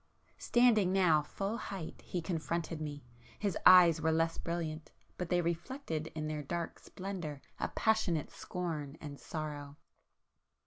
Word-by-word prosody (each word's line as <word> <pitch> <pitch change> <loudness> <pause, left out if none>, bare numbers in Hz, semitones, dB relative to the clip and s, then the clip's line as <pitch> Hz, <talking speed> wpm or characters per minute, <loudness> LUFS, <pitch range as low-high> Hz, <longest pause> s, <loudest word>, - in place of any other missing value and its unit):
Standing 230 -6 +4
now 180 -5 +5
full 195 +8 -3
height 195 -7 -6
he 175 -2 -3
confronted 165 -1 -2
me,—his 145 - -5
eyes 175 -3 +8
were 160 +1 +3
less 165 +1 +1
brilliant, 160 -2 -3 0.2
but, 180 -2 -4
they 180 -1 +3
reflected 170 - -3
in 155 -1 -2
their 155 -1 -2
dark 170 +4 -4
splendour 180 -7 -6 0.2
a - - 0
passionate 210 -8 +1
scorn 160 -5 -4
and 145 -2 -8
sorrow. 145 -2 -5
165 Hz, 130 wpm, -33 LUFS, 155-185 Hz, 0.2 s, eyes